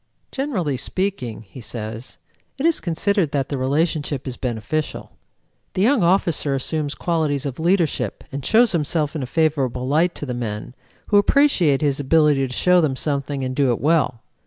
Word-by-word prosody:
"Generally 195 - -2
speaking," 130 - -2
he 110 +5 -12
says, 110 +1 -6 0.4
"it 275 - -2
is 335 -1 +3
considered 180 0 0
that 140 -2 -1
the 145 - -2
relationship 145 0 -1
is 130 - -4
beneficial. 125 +6 -3 0.6
The 185 - +2
young 250 +1 +3
officer 170 -5 +2
assumes 145 +2 -2
qualities 155 -5 -1
of 135 0 -4
leadership 170 -1 0
and 140 0 -5
shows 230 - +4
himself 155 -2 0
in 155 - -2
a 130 - -4
favorable 135 -5 0
light 165 +5 +2
to - - -5
the 125 - -4
men, 115 -1 -5 0.4
who 205 - +6
appreciate 200 - +3
his 140 -2 +1
ability 145 -1 +3
to - - -10
show 180 +7 +3
them 145 -5 0
something 140 -1 -2
and 130 0 -3
do 140 -2 +2
it 120 - -1
well. 145 -6 +1
145 Hz, 170 wpm, -21 LUFS, 130-170 Hz, 0.6 s, who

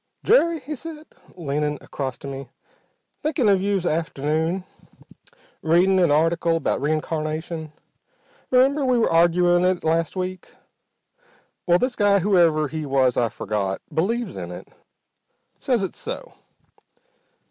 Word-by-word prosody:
"Jerry," 335 -8 +4
he 305 - -6
said, 310 +2 -8 0.3
leaning 150 -2 -2
across 130 -3 -5
to - - -9
me, 135 0 -7 0.7
"thinkin' 295 -6 0
of 195 -2 +4
you 200 0 +1
s'afternoon. 160 +1 -1 1.0
Readin' 180 +4 +3
an 175 -3 +4
article 165 +2 +2
about 165 - -1
reincarnation. 155 +1 -2 0.8
Remember 270 +3 +3
we 255 -2 +2
were 230 - +2
arguin' 175 +1 +4
it 185 -1 +1
last 165 +2 0
week? 185 0 -5 1.1
Well, 175 0 +5
this 250 +4 -1
guy, 205 -1 +4
whoever 170 -6 +3
he 155 +2 -5
was 135 -3 +2
I've 120 -2 0
forgot, 100 -2 -2
believes 230 +7 -1
in 90 -2 -6
it. 90 - -9 0.9
Says 245 -6 0
it's 190 - -5
so. - - -6
170 Hz, 125 wpm, -23 LUFS, 155-200 Hz, 1.1 s, Well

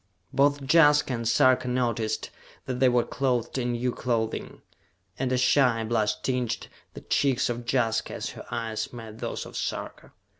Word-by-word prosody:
Both 145 +1 +3
Jaska 150 -4 +5
and 115 -1 -2
Sarka 130 +2 +4
noticed 115 -3 -1 0.3
that 125 -1 -3
they 130 - +5
were 120 -1 +3
clothed 130 -1 -1
in 120 -1 -1
new 125 +1 -1
clothing, 115 -3 -3 0.6
and 130 -1 -1
a 130 - +2
shy 125 -2 +3
blush 110 -2 0
tinged 125 -3 -2 0.3
the - - -8
cheeks 135 -3 +1
of 120 -1 -4
Jaska 115 -4 0
as - - -4
her - - -10
eyes 115 -2 -3
met 115 -2 -9
those - - -4
of - - -11
Sarka. - - -5
125 Hz, 160 wpm, -26 LUFS, 115-130 Hz, 0.6 s, Jaska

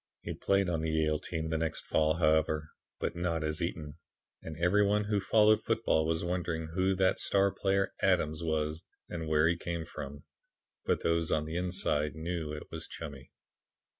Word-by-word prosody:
He - - -4
played 100 -1 +1
on 85 -2 0
the 80 - -1
Yale 80 -1 +1
team 80 -1 -4
the 80 - 0
next 80 0 -2
fall, 80 0 +2
however, 80 -1 +2 0.3
but - - -2
not 85 -2 -1
as 75 +3 -2
Eaton, 80 -3 -4 0.4
and 80 -1 -7
every 90 +5 +3
one 105 +1 +2
who 105 0 0
followed 110 +2 +4
football 110 -9 +1
was 80 0 0
wondering 85 -2 -2
who 95 +1 +2
that 95 0 +2
star 100 0 +3
player 100 0 0
'Adams' 80 -5 +2
was 80 0 -1 0.3
and 80 -2 -4
where 80 0 +4
he 85 - +2
came 85 -1 -4
from. 70 -2 -8 0.6
But - - 0
those 85 -1 +1
on 75 -1 +1
the 80 +1 -5
inside 90 -5 0
knew 80 -1 -3
it 75 0 -8
was - - -5
Chummy. 70 -5 -8
80 Hz, 180 wpm, -31 LUFS, 80-90 Hz, 0.6 s, followed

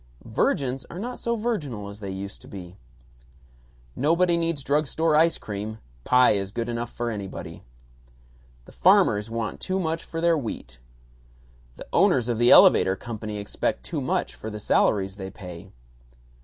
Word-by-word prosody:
Virgins 130 -1 0
are - - -8
not 245 +6 -5
so 235 0 -1
virginal 150 - -3
as 100 +1 -10
they 100 -2 -6
used 100 +2 -6
to - - -14
be. 90 -2 -9 1.2
Nobody 170 +4 +2
needs 165 -4 -1
drug 145 +2 +1
store 160 +2 +1
ice 165 +2 +4
cream; 105 +1 -6 0.3
pie 125 0 +5
is 100 -2 -1
good 115 +2 -3
enough 120 0 -3
for 120 -1 -3
anybody. 100 -3 -7 1.0
The - - -15
farmers 105 +1 +3
want 115 -1 -3
too 185 +1 -2
much 165 -2 -2
for 165 - -6
their 170 0 +3
wheat. 85 - -6 1.0
The - - -9
owners 120 -1 +3
of 115 -2 -1
the 120 0 +5
elevator 95 - +7
company 110 0 -6
expect 100 -10 -2
too 65 - -4
much - - -1
for 110 - -7
the 105 -1 -6
salaries 100 -1 +1
they 95 -1 -6
pay. 90 -1 -10
115 Hz, 160 wpm, -25 LUFS, 100-160 Hz, 1.2 s, elevator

